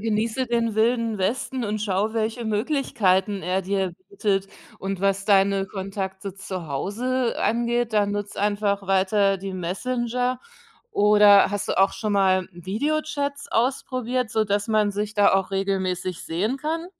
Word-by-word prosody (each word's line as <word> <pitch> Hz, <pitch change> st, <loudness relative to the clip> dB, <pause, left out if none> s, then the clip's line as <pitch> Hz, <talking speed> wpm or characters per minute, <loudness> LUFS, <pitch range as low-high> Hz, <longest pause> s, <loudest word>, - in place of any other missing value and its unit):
genieße 225 Hz, +4 st, -1 dB
den 230 Hz, -2 st, 0 dB
Wilden 230 Hz, 0 st, +1 dB
Westen 240 Hz, +5 st, -2 dB
und 210 Hz, +1 st, -2 dB
schaue, 205 Hz, +1 st, 0 dB
welche 225 Hz, +1 st, -2 dB
Möglichkeiten 210 Hz, -4 st, +1 dB
er 185 Hz, +2 st, 0 dB
dir 190 Hz, -1 st, -1 dB, 0.2 s
bietet. 195 Hz, -, 0 dB, 0.3 s
Und 195 Hz, -1 st, -4 dB
was 195 Hz, 0 st, +1 dB
deine 195 Hz, -1 st, +3 dB
Kontakte 190 Hz, 0 st, -5 dB
zu 190 Hz, -3 st, -6 dB
Hause 235 Hz, -, -1 dB
angeht, 235 Hz, 0 st, 0 dB
da 210 Hz, -1 st, +4 dB
nutze 205 Hz, 0 st, -4 dB
einfach 205 Hz, -1 st, 0 dB
weiter 195 Hz, +1 st, +2 dB
die 195 Hz, 0 st, -6 dB
Messenger. 245 Hz, +7 st, -2 dB, 0.5 s
Oder 205 Hz, -1 st, +6 dB
hast 205 Hz, -1 st, -3 dB
du -, -, 0 dB
auch 195 Hz, -, +4 dB
schon 215 Hz, -2 st, -2 dB
mal 185 Hz, -2 st, +3 dB
Videochats 285 Hz, -, -2 dB
ausprobiert, 250 Hz, 0 st, -1 dB
sodass 205 Hz, 0 st, 0 dB
man 215 Hz, -2 st, +2 dB
sich 210 Hz, +1 st, -3 dB
da 205 Hz, -1 st, +4 dB
auch 190 Hz, 0 st, +1 dB
regelmäßig 190 Hz, -2 st, -2 dB
sehen 210 Hz, +11 st, -2 dB
kann? 325 Hz, +4 st, -3 dB
205 Hz, 140 wpm, -24 LUFS, 195-235 Hz, 0.5 s, Oder